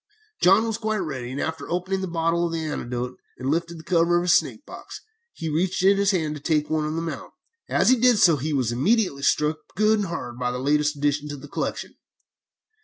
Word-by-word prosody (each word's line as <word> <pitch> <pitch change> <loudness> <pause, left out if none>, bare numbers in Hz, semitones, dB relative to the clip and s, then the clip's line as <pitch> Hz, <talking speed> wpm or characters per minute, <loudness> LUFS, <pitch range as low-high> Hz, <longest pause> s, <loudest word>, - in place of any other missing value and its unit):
"John 195 +5 +5
was 225 -1 -2
quite 220 -1 -1
ready, 135 -10 -4
and 135 - -5
after 160 0 -4
opening 185 +2 -2
a - - -2
bottle 170 0 0
of - - -6
the 160 -1 -2
antidote 125 -4 -4 0.2
he - - -11
lifted 165 +5 -1
the 160 - -11
cover 170 0 +2
of 175 - 0
his 175 -1 +4
snake - - 0
box, - - -10 0.4
and 160 -2 -3
reached 180 +3 0
in 195 +1 +5
his 200 -1 +2
hand 160 -6 0
to 150 - -8
take 150 -1 0
one 155 -1 +1
of 155 - -3
them 165 0 -3
out. - - -7 0.4
As - - +3
he 255 - +5
did 245 -1 +5
so, 170 -7 +5
he 150 +4 -3
was 130 -5 0
immediately 150 - +1
struck 150 +2 +2 0.2
good 215 +2 +3
and 200 - -1
hard 125 -8 -6
by 125 0 0
our 125 - -4
latest 145 +3 +1
addition 145 +1 0
to 145 - -5
the 145 +2 -11
collection. - - -4
165 Hz, 230 wpm, -24 LUFS, 145-185 Hz, 0.4 s, John